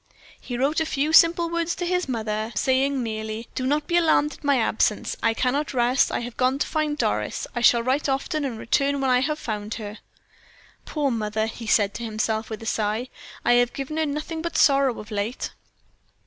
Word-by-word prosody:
He 245 - -5
wrote 280 +6 +1
a 320 - +1
few 295 +2 0
simple 335 +1 +6
words 335 0 -1
to 355 - -3
his 360 -3 0
mother, 220 -2 -2
saying 265 +3 +1
merely: 220 0 -4
"Do 255 - -2
not 295 +2 +1
be 345 - +1
alarmed 315 -3 +3
at - - -16
my 285 -1 +3
absence. 220 -2 +1
I 225 0 +2
cannot 270 +4 -1
rest 245 +2 +3
I - - -1
have 240 0 -7
gone 255 +1 +2
to - - 0
find 305 -1 -1
Doris. - - -1
I 240 - -1
shall 235 -1 +5
write 270 +4 0
often, 290 +3 -1
and 255 -5 -3
return 280 +5 +1
when 265 -1 +1
I 250 - +4
have 300 +4 -1
found 215 -4 -4
her." 210 -1 -7 0.9
"Poor 290 -3 -1
mother," 220 -1 -1
he 225 0 -7
said 205 -2 +3
to 235 - -6
himself 220 0 -2
with 220 0 -6
a - - -8
sigh, 220 +3 -1 0.4
"I - - +5
have 245 0 -1
given 275 +3 -5
her 315 -1 +1
nothing 305 +3 -4
but 340 0 -3
sorrow 275 -4 +4
of 210 +1 -10
late." 210 +4 -3
255 Hz, 205 wpm, -24 LUFS, 225-295 Hz, 0.9 s, simple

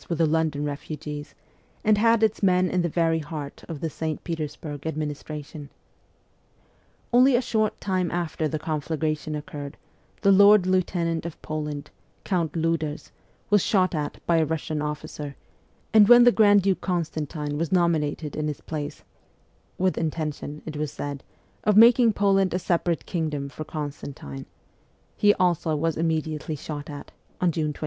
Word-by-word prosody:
with 170 - -1
the 165 - +3
London 155 -2 0
refugees, 145 0 -6 0.5
and 215 -1 +4
had 230 0 +4
its 220 -1 +1
men 185 -2 +3
in 180 - +1
the 170 - 0
very 165 0 +1
heart 150 -2 -7
of 160 -3 -5
the 165 - -1
St. 155 0 -4
Petersburg 155 -2 -5
administration. 150 -1 -5 1.4
Only 255 +2 +6
a 240 - +3
short 220 -3 0
time 185 -3 0
after 170 -2 -1
the 155 - -2
conflagration 155 0 -2
occurred, 145 -2 -7 0.4
the 200 - +5
Lord 200 0 +7
Lieutenant 175 -3 0
of 170 - -9
Poland, 150 -2 -4 0.3
Count 170 -6 -1
Liiders, 160 -2 -2 0.4
was 205 -1 +5
shot 185 -3 +2
at 150 -2 -3
by 170 - +3
a 160 - +3
Russian 155 -1 -3
officer; 150 -1 -5 0.6
and 215 -2 +7
when 240 0 +9
the 245 - +7
grand 205 -3 +5
duke 190 -2 +1
Constantine 155 -4 -2
was 165 -1 -2
nominated 160 -4 +1
in 150 0 -2
his 150 - -4
place 150 -2 -6 0.7
(with 185 0 +1
intention, 150 -2 -4
it 150 -2 -6
was 150 -2 -2
said 145 -2 -5 0.2
> - - -37
of 210 -1 +4
making 235 0 +7
Poland 195 -2 +2
a - - +2
separate 170 -2 0
kingdom 150 -5 -2
for 155 - -7
Constantine) 140 - -7 0.7
he 205 0 +4
also 175 -3 +1
was 160 +1 0
immediately 160 -1 -1
shot 145 +1 -7
at, 145 -1 -8 0.3
on 180 -1 +2
June 155 -1 -1
26. - - -15
160 Hz, 155 wpm, -25 LUFS, 150-185 Hz, 1.4 s, when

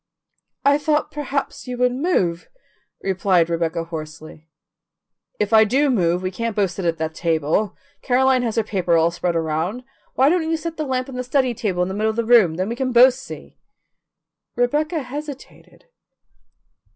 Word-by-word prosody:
"I 285 +1 +4
thought 300 0 0
perhaps 280 -2 -4
you 250 0 -4
would 250 0 +2
move," 245 - 0 0.6
replied 185 -3 +1
Rebecca 165 0 -1
hoarsely. 155 -1 -9 0.9
"If 235 - -1
I 220 0 +8
do 270 +6 +2
move, 180 -5 +1
we 185 - -2
can't 230 +3 -3
both 195 -4 +1
sit 190 -1 -5
at 165 -1 0
that 160 0 -3
table. 165 +4 -1 0.2
Caroline 260 0 +2
has 230 -3 -2
her 225 - +2
paper 180 -5 +1
all 165 +1 +3
spread 175 0 -2
around. 165 +9 -2 0.3
Why 265 - +4
don't 330 -1 +1
you 325 - +1
set 330 +1 -6
the 310 -2 -3
lamp 255 -1 -1
on 270 - -9
the 250 - -2
study 255 0 +1
table 190 -5 -1
in - - -2
the 190 - -4
middle 215 +2 0
of 220 - -3
the 235 0 -1
room, 220 -9 +5
then 185 +3 -2
we 235 - -3
can 260 0 -2
both 250 +2 +7
see?" 265 +1 -11 1.0
Rebecca 300 +6 0
hesitated. 285 - -9
225 Hz, 175 wpm, -21 LUFS, 170-265 Hz, 1.0 s, I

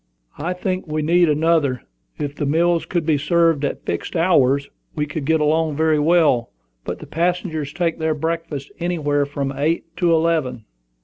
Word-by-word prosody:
"I 170 +5 -2
think 185 0 -3
we 155 0 -2
need 170 +2 +4
another. 150 -4 +1 0.3
If 145 -2 -3
the 145 - -2
meals 170 +3 +2
could 175 -3 -1
be 155 -3 +2
served 165 0 +2
at 140 - -3
fixed 85 - -4
hours, 140 -5 +3 0.3
we 150 -2 0
could 150 -1 -5
get 160 +2 +2
along 155 0 +1
very 155 0 +2
well; 150 -7 +3 0.3
but - - -4
the - - -10
passengers 165 -3 -1
take 165 0 -1
their 160 -1 0
breakfast 160 -2 -4
anywhere 145 -5 0
from 140 -1 -3
eight 165 +3 -1
to 175 -1 +2
eleven." 160 -8 +1
160 Hz, 170 wpm, -21 LUFS, 145-170 Hz, 0.3 s, need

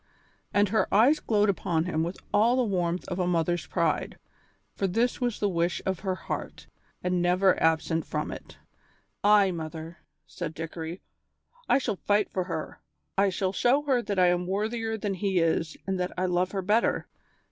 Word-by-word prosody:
And 205 -1 +3
her 220 - +1
eyes 245 +10 +5
glowed 210 -2 +2
upon 170 -4 0
him 160 -3 -1
with 170 +3 -3 0.2
all 230 +4 +4
the 255 - +2
warmth 180 -4 -1
of 180 0 -4
a 180 - +1
mother's 175 0 0
pride, - - -1 0.6
for 195 - 0
this 230 +8 0
was 240 -3 -1
the 205 - +1
wish 175 -2 0
of 190 -2 -1
her 190 -2 -2
heart, 185 - -6 0.4
and 180 0 +1
never 180 +2 +3
absent 160 0 +1
from - - -3
it. - - -10 0.7
"Ay, 205 -2 +5
mother," 160 0 -6 0.3
said 165 -3 -6
Dickory, 165 +2 -6 0.7
"I - - +6
shall 230 -7 -2
fight 205 0 +2
for 185 -1 -1
her; - - -5 0.3
I 195 +1 +3
shall 190 0 -1
show 255 +8 +3
her 265 -4 +2
that 205 -4 -3
I 180 -1 +5
am 175 0 0
worthier 220 +3 -1
than 205 -1 -2
he 190 0 -1
is 165 -1 +1
and 190 -1 -2
that 180 0 -1
I 185 - +1
love 180 0 +1
her 195 -1 -2
better. 215 +5 +1
185 Hz, 180 wpm, -27 LUFS, 175-210 Hz, 0.7 s, I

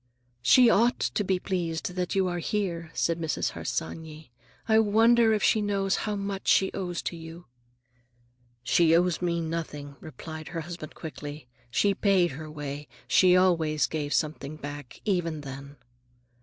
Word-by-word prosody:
"She 240 - +6
ought 230 +2 +4
to 210 - 0
be 190 -1 +1
pleased 180 -2 -3
that 180 0 -2
you 190 -1 +2
are 175 -1 -2
here," 170 -3 -2
said 165 0 0
Mrs. 160 -2 -1
Harsanyi. 160 -3 -5 0.4
"I 220 -1 +5
wonder 225 +2 +5
if 215 -2 +1
she 220 - +4
knows 200 -1 0
how 210 - -1
much 200 -1 -4
she 190 - +4
owes 175 -3 -4
to - - -3
you." 165 +1 -10 1.2
"She 165 +4 +4
owes 175 0 +2
me 170 -1 0
nothing," 155 -4 -5
replied 160 0 -9
her 170 -2 -4
husband 165 -1 -8
quickly. 150 -2 -8 0.2
"She 200 +10 +2
paid 190 -3 +2
her 155 +3 -8
way. 145 -1 -6 0.2
She 180 -1 +5
always 165 -5 +3
gave 150 -2 -3
something 155 -2 -1
back, 145 -3 -8
even 170 -6 0
then." 140 0 -9
170 Hz, 155 wpm, -27 LUFS, 155-195 Hz, 1.2 s, She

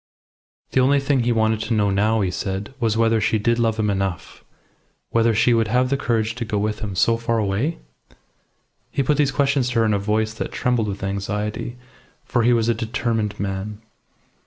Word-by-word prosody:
The - - +2
only 140 +2 +4
thing 140 -1 +1
he 120 0 +1
wanted 110 -1 +2
to 115 +1 -1
know 105 -2 +2
now, 105 +3 +2
he 95 -2 0
said, 95 +6 -4
was 110 -2 +1
whether 115 -1 +3
she 110 +1 +2
did 115 +3 +1
love 115 -1 +1
him 105 -2 +1
enough 95 -5 -4 0.7
whether 115 -1 +3
she 120 +3 +4
would 115 -1 +2
have 125 +3 +1
the - - +3
courage 115 -4 0
to 120 - -2
go 105 -2 -2
with 105 +1 -1
him 100 -3 -5
so 115 +5 +3
far 115 0 -1
away? 110 +10 -1 1.1
He 140 - -1
put 145 +3 +1
these 145 -2 +2
questions 135 -1 +1
to 120 -2 0
her - - +3
in 105 - +2
a 100 - +1
voice 110 +2 0
that 110 - -5
trembled 120 -3 0
with 100 -1 -5
anxiety 105 +4 -3 0.5
for 120 - 0
he 120 +2 +4
was 115 -2 +2
a 120 - +3
determined 115 -2 -2
man. 100 +1 -4
110 Hz, 205 wpm, -22 LUFS, 105-120 Hz, 1.1 s, only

